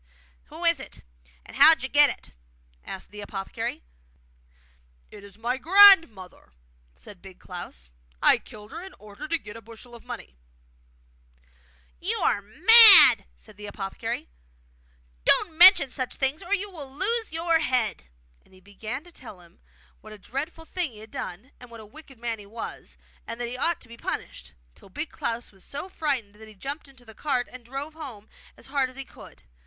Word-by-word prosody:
'Who - - -9
is - - +2
it, - - -11 0.4
and - - -12
how - - +8
did - - -13
you - - -3
get - - +6
it?' - - -7 0.5
asked 190 - -9
the 210 0 -9
apothecary. 195 - -6 1.3
'It 200 - -13
is 200 0 -15
my 240 +3 -2
grandmother,' 325 - +5 0.4
said 185 - -15
Big 190 -2 -14
Klaus. 65 - -10 0.3
'I - - +4
killed 210 0 -14
her 335 - -8
in 380 +1 -12
order 210 +5 -11
to 330 +1 0
get 210 -8 -12
a 230 - -10
bushel 230 +2 -14
of 235 - -13
money.' 60 - -10 1.6
'You - - -2
are 205 - 0
mad!' 400 - +9
said 215 -2 -17
the 210 0 -9
apothecary. 195 -1 -6 1.0
'Don't 320 - +2
mention 345 -6 +7
such 255 -1 -5
things, 270 +4 -2
or 390 +2 -1
you 405 0 -6
will 290 -7 -9
lose 435 - -2
your 330 0 +1
head!' 250 - -1 0.4
And 190 - -24
he - - -18
began 215 +7 -8
to 350 - -18
tell 230 - -12
him 175 +2 -21 0.4
what 215 0 -13
a - - -12
dreadful 275 - -7
thing 340 -7 -3
he - - -15
had 220 +1 -14
done, 200 +10 -8
and 245 - -14
what 230 -1 -12
a 220 - -12
wicked 275 +3 -15
man 230 -1 -5
he 205 - -13
was, 225 +3 -9 0.3
and 230 - -6
that 240 - -3
he 240 - -6
ought 330 +6 -1
to - - -14
be 235 0 -13
punished; 65 - -6 0.2
till 195 - -19
Big 295 - -5
Klaus 235 +1 -5
was 195 -2 -16
so 285 +7 -8
frightened 275 - -3
that 220 +1 -14
he 215 - -14
jumped 280 +10 -7
into 265 -3 -18
the 220 - -13
cart 255 -1 -2
and 255 -1 -11
drove 275 +6 -7
home 255 -10 -11 0.3
as - - -17
hard 270 -1 -1
as 255 - -14
he 270 0 -7
could. 65 - -16
245 Hz, 190 wpm, -25 LUFS, 210-310 Hz, 1.6 s, mad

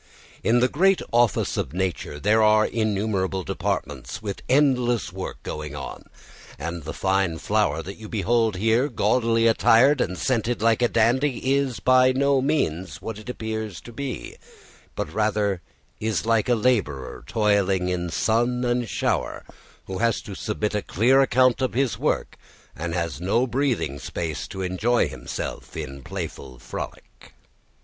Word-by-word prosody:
In 120 +2 +3
the 125 - +5
great 190 +8 +3
office 120 -1 +2
of - - -2
nature 90 -5 -3
there 105 +6 +3
are 110 0 +5
innumerable 100 -4 -1
departments - - -3
with 100 -3 -5
endless 125 -6 +2
work 95 0 -5
going 75 -1 -5
on, 70 - -7 0.5
and 85 +4 -4
the 80 - -4
fine 95 -3 +1
flower 90 -6 0
that 100 +4 -8
you 110 -1 -10
behold 115 0 +1
there, 115 +8 +2
gaudily 115 0 +2
attired 120 +4 +5
and 90 0 -1
scented 120 0 0
like 115 +1 +2
a 120 - +5
dandy, 130 +4 +2
is 140 -3 0
by 130 0 +5
no 140 0 +2
means 90 - -1
what 110 +2 -6
it 110 - -10
appears 110 -5 -4
to 120 - -11
be, 135 0 -5 0.6
but - - -4
rather, 105 -3 0 0.4
is 110 0 -1
like 115 0 +2
a 120 - +5
labourer 105 - 0
toiling 100 -4 +2
in 90 -1 -1
sun 120 +7 +1
and 120 -1 0
shower, - - -1 0.4
who 95 -1 -5
has 115 +2 +2
to 100 - -8
submit 105 +1 -2
a 105 - 0
clear 125 +10 +3
account 130 -1 +3
of 130 - 0
his 135 -2 0
work - - -1 0.4
and 85 0 -4
has 85 -4 -2
no 110 +7 +2
breathing 120 - -1
space 80 -1 -4
to 95 -1 -5
enjoy 100 +5 +1
himself 65 -3 -6
in 70 +1 -6
playful 80 -8 -7
frolic. 65 - -9
110 Hz, 155 wpm, -24 LUFS, 95-120 Hz, 0.6 s, the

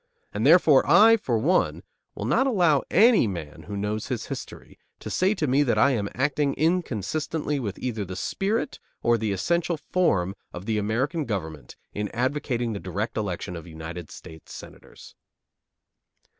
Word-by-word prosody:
And 110 +5 0
therefore 155 -4 +6
I, 215 +8 +7
for 125 - -1
one, 165 +12 +1 0.3
will - - -5
not 265 - +2
allow 175 - +3
any 220 - +5
man 85 -7 -7
who 100 - -5
knows 105 +2 -3
his - - -3
history - - -9 0.2
to - - -7
say 190 +3 +2
to 155 - -1
me 135 +1 +3
that 135 -5 +1
I 140 - +5
am 105 -6 -1
acting 140 +2 0
inconsistently 155 - -1
with 105 -6 -4
either 115 -5 -3
the 95 -1 -7
spirit 210 - -2 0.2
or 120 - +4
the 110 -1 -1
essential 170 - 0
form 100 - 0 0.2
of 90 +2 -8
the 110 -1 0
American 130 +9 -1
government 80 - -5 0.2
in 105 0 -3
advocating 125 -2 -1
the 100 - -4
direct 100 +5 -4
election 95 -4 -3
of 85 +1 -9
United 80 +1 -8
States 80 -1 -12
Senators. - - -13
120 Hz, 160 wpm, -25 LUFS, 100-155 Hz, 0.3 s, I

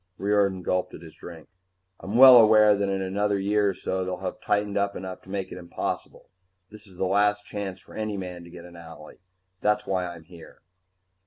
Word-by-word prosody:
Riordan 100 -2 0
gulped 90 +1 -2
at 85 - -12
his 80 - -13
drink. 85 -2 -12 0.5
"I'm 100 +4 -6
well 130 0 +10
aware 110 -2 +6
that 100 0 -1
in 95 0 -2
another 100 +2 -1
year 100 +1 +1
or - - -2
so 95 +1 -3
they'll 90 0 -4
have 95 0 -6
tightened 105 -1 -1
up 100 0 -1
enough 95 0 -7
to - - -19
make 95 -1 -4
it - - -8
impossible. 85 -1 -6 0.4
This 105 0 -14
is 95 -2 -17
the 95 - -1
last 105 +2 +1
chance 100 -3 -6
for - - -18
any 110 -2 -4
man 90 -2 -7
to 85 - -13
get 85 0 -12
an 90 - -14
owlie. 80 -2 -13 0.4
That's 105 0 +1
why 90 -2 -2
I'm 85 -2 -10
here." 85 -1 -16
95 Hz, 210 wpm, -25 LUFS, 90-105 Hz, 0.5 s, well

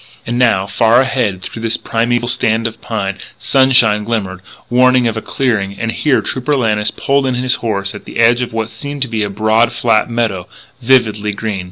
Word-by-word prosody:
And 120 +1 -2
now, 110 -6 +3
far 115 +4 +3
ahead 120 -8 -1
through 115 - -7
this 115 0 0
primeval 120 +1 -1
stand 115 -2 +1
of 115 - -4
pine, 100 -5 -4 0.2
sunshine 120 -6 +3
glimmered, 105 -5 -3 0.3
warning 125 0 +3
of 115 - -2
a 110 - -3
clearing. 105 -8 -2
And 115 0 -2
here 140 +2 +1
Trooper 130 +3 -1
Lannis 105 -5 +1
pulled 140 -1 0
in 130 - -1
his 125 0 +1
horse 100 -4 -2
at 105 - -10
the - - -8
edge 120 +2 +4
of 125 - -3
what 115 0 -3
seemed 140 +4 -4
to - - -4
be 110 -2 -3
a 105 - -1
broad, 110 +3 +2
flat 115 -1 +1
meadow, 110 -6 -2 0.3
vividly 110 -4 +2
green. 105 -1 -4
115 Hz, 195 wpm, -15 LUFS, 105-125 Hz, 0.3 s, edge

